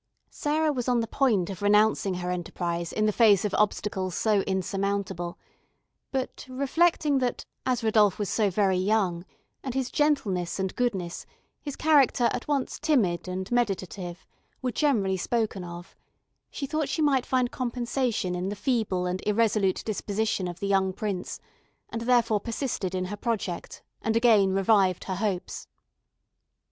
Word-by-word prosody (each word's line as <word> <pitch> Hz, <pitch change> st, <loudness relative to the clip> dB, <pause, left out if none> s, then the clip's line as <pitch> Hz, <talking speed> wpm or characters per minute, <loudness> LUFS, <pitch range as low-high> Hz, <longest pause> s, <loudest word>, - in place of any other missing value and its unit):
Sarah 305 Hz, +1 st, 0 dB
was 250 Hz, -2 st, -3 dB
on 245 Hz, -1 st, +3 dB
the -, -, -1 dB
point 220 Hz, -7 st, +1 dB
of 190 Hz, -, -8 dB
renouncing 205 Hz, -2 st, +3 dB
her 180 Hz, 0 st, -3 dB
enterprise 170 Hz, -1 st, -3 dB
in 215 Hz, -, 0 dB
the 215 Hz, -, +3 dB
face 210 Hz, -3 st, +5 dB
of 205 Hz, -, -2 dB
obstacles 195 Hz, -3 st, 0 dB
so 215 Hz, -2 st, +2 dB
insurmountable; 190 Hz, -2 st, -2 dB, 0.7 s
but, 265 Hz, -2 st, -3 dB
reflecting 285 Hz, +2 st, +2 dB
that, 250 Hz, -2 st, -2 dB, 0.2 s
as 250 Hz, -2 st, 0 dB
Rodolph 215 Hz, -3 st, +4 dB
was 205 Hz, -2 st, -2 dB
very 200 Hz, -3 st, +2 dB
young, 185 Hz, -3 st, +1 dB, 0.4 s
and 260 Hz, -2 st, -4 dB
his 265 Hz, -2 st, -1 dB
gentleness 205 Hz, -, +1 dB
and 190 Hz, -1 st, -2 dB
goodness, 195 Hz, -9 st, -2 dB, 0.3 s
his 285 Hz, -2 st, -5 dB
character 275 Hz, -6 st, +4 dB
at -, -, -4 dB
once 280 Hz, -3 st, -1 dB
timid 205 Hz, -, +1 dB
and 185 Hz, +2 st, -4 dB
meditative, 190 Hz, -6 st, -2 dB, 0.3 s
were 255 Hz, -1 st, -2 dB
generally 220 Hz, -10 st, +1 dB
spoken 215 Hz, -1 st, -1 dB
of, 175 Hz, 0 st, -9 dB, 0.5 s
she 280 Hz, -, -4 dB
thought 310 Hz, +1 st, -2 dB
she 315 Hz, -, 0 dB
might 270 Hz, -4 st, +3 dB
find 255 Hz, -2 st, +1 dB
compensation 240 Hz, -5 st, -1 dB
in 180 Hz, +2 st, -2 dB
the 205 Hz, -, -3 dB
feeble 210 Hz, -6 st, 0 dB
and 180 Hz, +1 st, -2 dB
irresolute 210 Hz, -3 st, +2 dB
disposition 210 Hz, -2 st, -1 dB
of 175 Hz, 0 st, -7 dB
the 200 Hz, -, -2 dB
young 190 Hz, -1 st, +2 dB
prince, 200 Hz, -2 st, -4 dB, 0.5 s
and 230 Hz, -, -4 dB
therefore 235 Hz, -3 st, +3 dB
persisted 225 Hz, -5 st, -3 dB
in 185 Hz, 0 st, -1 dB
her 205 Hz, +3 st, -5 dB
project, 205 Hz, -6 st, -3 dB, 0.2 s
and 220 Hz, 0 st, 0 dB
again 220 Hz, -5 st, +5 dB
revived 195 Hz, -1 st, +3 dB
her 185 Hz, -2 st, -4 dB
hopes. 195 Hz, -3 st, -3 dB
210 Hz, 150 wpm, -27 LUFS, 185-245 Hz, 0.7 s, face